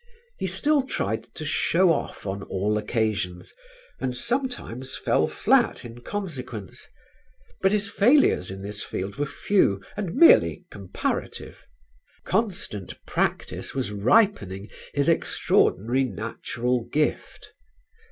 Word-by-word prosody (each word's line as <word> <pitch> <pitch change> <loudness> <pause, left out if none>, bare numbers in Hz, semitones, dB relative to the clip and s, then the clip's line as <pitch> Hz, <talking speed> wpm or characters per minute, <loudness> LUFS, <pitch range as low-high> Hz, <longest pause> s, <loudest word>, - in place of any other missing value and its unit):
He - - -1
still 300 -1 +2
tried 110 - -2
to 155 - -6
show 170 +3 +3
off - - -5
on 100 0 -3
all 100 +2 -1
occasions 105 -5 -2 0.5
and 125 -1 -2
sometimes 235 - -3
fell - - +2
flat - - +2
in 120 0 -10
consequence; 125 - -6 0.7
but 190 - +4
his 205 -1 +1
failures 215 - +4
in 95 +1 -7
this 105 +1 -4
field 95 +5 -5
were 145 0 -1
few 135 - +2 0.2
and 195 -4 -4
merely 85 - +6
comparative; 95 -3 -5 0.6
constant 180 - -2
practice - - -2
was 130 -5 -2
ripening 105 - +2 0.2
his 140 +1 0
extraordinary 130 - +2
natural 120 +3 -2
gift. 150 0 -2
125 Hz, 115 wpm, -25 LUFS, -, 0.7 s, merely